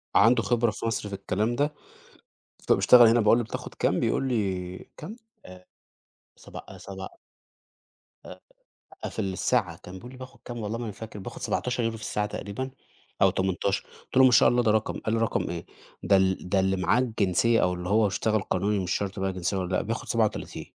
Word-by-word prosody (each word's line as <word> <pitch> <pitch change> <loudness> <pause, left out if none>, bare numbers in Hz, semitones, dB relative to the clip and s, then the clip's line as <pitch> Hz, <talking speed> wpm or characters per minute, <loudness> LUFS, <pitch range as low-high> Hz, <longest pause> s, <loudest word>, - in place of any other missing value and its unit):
عنده 115 +3 +5
خبرة 120 -2 +2
في 110 - -6
مصر 110 -2 -2
في 100 - -4
الكلام 110 +5 -1
ده، 145 +3 0 1.0
فبيشتغل 120 -2 +7
هنا، 115 +1 +4
باقول 110 +2 +5
له 120 - -1
بتاخد 110 - -7
كام؟ - - +1
بيقول 135 - 0
لي 95 -6 -2 0.2
كام؟ 215 - -8 0.3
آآ 90 0 -13 0.7
سبع - - -10
آآ، - - -11
سبع 95 -1 -8 1.2
آآ - - -10 0.7
في - - -8
الساعة، 95 -1 0
كان 90 - -10
بيقول 120 +7 -10
لي 130 - -12
بياخد 130 0 -11
كام، 120 -1 -6
والله 110 +1 -3
ما 120 - -5
أنا 110 - -4
فاكر 110 0 -9
بيأخد 95 - -8
€17 120 -3 -1
في 110 - -11
الساعة 105 +1 -1
تقريبًا، 105 +6 -5 0.5
أو - - +7
18 95 +1 -1 0.2
قُلت - - -4
له: 130 - +8
"ما 130 - +6
شاء - - +6
الله 120 0 +2
ده 110 - +3
رقم"، 110 0 0
قال 110 - -2
لي: - - 0
"رقم 115 - 0
إيه؟ 85 -1 -5 0.4
ده 100 - +4
ال 95 -1 0
ده 100 -1 +2
اللي 95 0 +2
معاه 95 +6 +2
الجنسية، 115 -1 +2
أو 90 0 +2
اللي 90 0 -5
هو 105 +1 +4
اشتغل 110 +2 0
قانوني 100 +2 0
مش 90 -1 -3
شرط 100 0 -4
بقى 95 0 -1
جنسية 90 +2 -2
والّا 95 0 -2
لأ، - - +1
بياخد - - -4
37" - - -1
105 Hz, 200 wpm, -26 LUFS, 95-115 Hz, 1.2 s, له